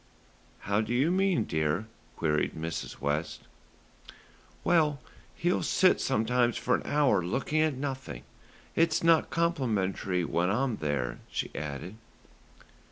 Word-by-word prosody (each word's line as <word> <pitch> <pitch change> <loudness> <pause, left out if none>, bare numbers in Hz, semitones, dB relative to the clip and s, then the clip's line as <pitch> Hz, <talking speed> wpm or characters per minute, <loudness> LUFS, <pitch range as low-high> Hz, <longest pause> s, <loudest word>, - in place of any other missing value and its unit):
"How 100 +2 +1
do 115 +2 -2
you 140 +7 +3
mean, 190 -1 +2
dear?" 80 +6 -1 0.3
queried 75 -2 0
Mrs. 80 +1 -5
West. 75 +3 -2 1.2
"Well, 155 -5 +3 0.4
he'll 175 +1 +1
sit 185 -1 +3
sometimes 120 -1 +1
for 125 - 0
an - - +2
hour 135 - +2
looking 135 - 0
at 155 -3 +2
nothing. 130 - -5 0.5
It's 165 -1 +2
not 165 -1 +4
complimentary 105 - 0
when 85 +2 0
I'm 125 +3 0
there," 70 -5 -2
she - - -3
added. 75 +7 -6
120 Hz, 120 wpm, -29 LUFS, -, 1.2 s, not